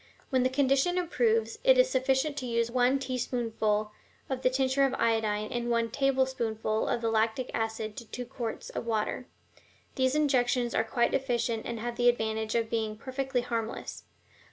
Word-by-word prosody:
When 260 Hz, -1 st, +3 dB
the 255 Hz, -, +2 dB
condition 275 Hz, +6 st, +2 dB
improves, 230 Hz, -10 st, +1 dB
it -, -, +6 dB
is -, -, +6 dB
sufficient 265 Hz, +3 st, +1 dB
to 255 Hz, -, -3 dB
use 235 Hz, 0 st, 0 dB
one 250 Hz, +2 st, +3 dB
teaspoonful 230 Hz, -5 st, -1 dB, 0.4 s
of 260 Hz, -1 st, -2 dB
the 255 Hz, -, +3 dB
tincture 265 Hz, +1 st, +2 dB
of 270 Hz, -1 st, +2 dB
iodine 220 Hz, -3 st, 0 dB
and 240 Hz, 0 st, -2 dB
one 230 Hz, -1 st, +1 dB
tablespoonful 255 Hz, -5 st, 0 dB
of 235 Hz, -, 0 dB
the 230 Hz, -, 0 dB
lactic 225 Hz, +3 st, 0 dB
acid 220 Hz, -1 st, -2 dB
to 235 Hz, -, -7 dB
two 250 Hz, +2 st, -6 dB
quarts 240 Hz, -3 st, -5 dB
of -, -, -5 dB
water. 225 Hz, +3 st, -1 dB, 0.7 s
These 260 Hz, 0 st, +1 dB
injections 250 Hz, -5 st, +2 dB
are -, -, +2 dB
quite 235 Hz, +1 st, 0 dB
efficient 235 Hz, -4 st, -1 dB
and 235 Hz, -1 st, -4 dB
have 235 Hz, +1 st, -4 dB
the 245 Hz, 0 st, +5 dB
advantage 220 Hz, -2 st, -1 dB
of 230 Hz, -1 st, +1 dB
being 220 Hz, -2 st, -2 dB
perfectly 260 Hz, +1 st, -2 dB
harmless. 230 Hz, -2 st, -4 dB
240 Hz, 170 wpm, -29 LUFS, 225-260 Hz, 0.7 s, it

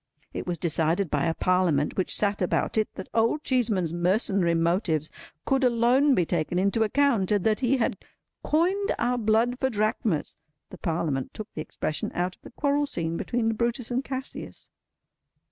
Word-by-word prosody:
It -, -, -5 dB
was 175 Hz, -1 st, -2 dB
decided 165 Hz, +2 st, 0 dB
by -, -, +1 dB
a 165 Hz, -1 st, 0 dB
Parliament 180 Hz, -6 st, +1 dB
which 185 Hz, -, +1 dB
sat 205 Hz, -1 st, +1 dB
about 180 Hz, -, 0 dB
it, 215 Hz, -1 st, +1 dB
that 190 Hz, -, -7 dB
Old 230 Hz, +7 st, +1 dB
Cheeseman's 215 Hz, -, +1 dB
mercenary 180 Hz, 0 st, +1 dB
motives 165 Hz, -2 st, 0 dB, 0.3 s
could 270 Hz, 0 st, +1 dB
alone 250 Hz, +3 st, +4 dB
be 175 Hz, -, +2 dB
taken 170 Hz, +1 st, -1 dB
into 200 Hz, +4 st, +1 dB
account, 220 Hz, -3 st, +2 dB
and 205 Hz, -3 st, +2 dB
that 215 Hz, -1 st, +2 dB
he 265 Hz, +1 st, +2 dB
had 235 Hz, -, -1 dB, 0.4 s
"coined 370 Hz, +6 st, +1 dB
our 245 Hz, +1 st, 0 dB
blood 230 Hz, +3 st, +2 dB
for 265 Hz, -, +1 dB
drachmas." 215 Hz, -, -1 dB, 0.3 s
The -, -, -10 dB
Parliament 160 Hz, -5 st, -2 dB
took 215 Hz, 0 st, -8 dB
the 155 Hz, -, -4 dB
expression 155 Hz, 0 st, -3 dB
out 180 Hz, +1 st, -1 dB
of -, -, -44 dB
the -, -, -11 dB
quarrel 285 Hz, +2 st, 0 dB
scene 165 Hz, -8 st, -2 dB
between 225 Hz, +4 st, -1 dB
Brutus 235 Hz, +2 st, -2 dB
and 250 Hz, +2 st, 0 dB
Cassius. 265 Hz, 0 st, -7 dB
210 Hz, 170 wpm, -26 LUFS, 175-245 Hz, 0.4 s, alone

